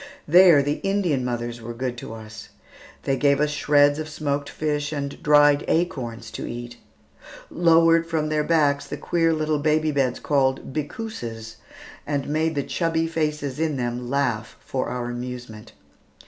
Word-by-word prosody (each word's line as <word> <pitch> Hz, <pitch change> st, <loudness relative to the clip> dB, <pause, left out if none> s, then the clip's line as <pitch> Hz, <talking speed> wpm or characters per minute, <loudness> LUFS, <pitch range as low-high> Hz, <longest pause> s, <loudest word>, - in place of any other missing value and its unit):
There 170 Hz, -3 st, +7 dB
the 145 Hz, +1 st, -1 dB
Indian 190 Hz, -9 st, 0 dB
mothers 120 Hz, -1 st, -4 dB
were 115 Hz, +1 st, -7 dB
good 125 Hz, 0 st, -3 dB
to 115 Hz, -, -8 dB
us. 110 Hz, -1 st, -11 dB, 0.5 s
They 135 Hz, -, +1 dB
gave 140 Hz, 0 st, +2 dB
us 150 Hz, 0 st, +1 dB
shreds 145 Hz, 0 st, +3 dB
of 155 Hz, 0 st, -5 dB
smoked 145 Hz, -1 st, -2 dB
fish 150 Hz, -1 st, -2 dB
and 140 Hz, -2 st, -4 dB
dried 145 Hz, -1 st, +5 dB
acorns 120 Hz, -9 st, -2 dB
to -, -, -6 dB
eat; 120 Hz, 0 st, -7 dB, 0.7 s
lowered 165 Hz, -1 st, +4 dB
from 160 Hz, -2 st, -1 dB
their 150 Hz, 0 st, +1 dB
backs 150 Hz, -3 st, +2 dB
the -, -, -5 dB
queer 165 Hz, -1 st, +1 dB
little 155 Hz, -1 st, 0 dB
baby 155 Hz, +1 st, +1 dB
beds, 135 Hz, -3 st, 0 dB
called 135 Hz, -2 st, 0 dB
"bickooses," 120 Hz, -, -6 dB, 0.5 s
and 145 Hz, -2 st, -2 dB
made 160 Hz, +2 st, 0 dB
the 140 Hz, -, 0 dB
chubby 165 Hz, +1 st, 0 dB
faces 150 Hz, -4 st, -2 dB
in 160 Hz, -3 st, 0 dB
them 120 Hz, 0 st, -3 dB
laugh 125 Hz, -5 st, -1 dB
for 130 Hz, -, -3 dB
our 120 Hz, -1 st, -3 dB
amusement. 120 Hz, -3 st, -7 dB
145 Hz, 155 wpm, -23 LUFS, 125-155 Hz, 0.7 s, There